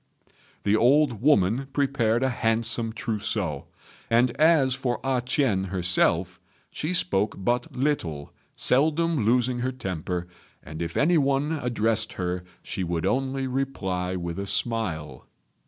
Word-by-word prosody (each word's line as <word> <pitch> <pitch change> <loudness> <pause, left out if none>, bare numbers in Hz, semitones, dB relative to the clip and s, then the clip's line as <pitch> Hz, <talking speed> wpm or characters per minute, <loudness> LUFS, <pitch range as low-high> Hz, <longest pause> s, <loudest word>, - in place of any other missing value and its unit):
The 100 +1 +3
old 125 0 +3
woman 125 -2 +3
prepared 130 -5 +1
a 130 - +2
handsome 115 -1 0
trousseau; 105 - -3 0.4
and 120 +2 +3
as 155 -5 +4
for 125 -2 -2
A 130 -2 +1
ch'ien 125 -7 +1
herself, 90 -1 +1 0.3
she 155 - -3
spoke 105 - +1
but 120 +8 -1
little, 90 - -2 0.2
seldom 155 +1 +2
losing 125 +2 +2
her 130 +2 -1
temper, 90 -6 -4 0.4
and 80 +2 -8
if 85 0 -4
any 165 +3 +4
one 140 +2 +1
addressed 115 -2 0
her 90 0 -3 0.2
she 95 - -4
would 85 -2 -2
only 135 +1 0
reply 95 -9 -2
with 85 0 -4
a 100 - -4
smile. 95 -11 -2
115 Hz, 130 wpm, -25 LUFS, 95-135 Hz, 0.4 s, as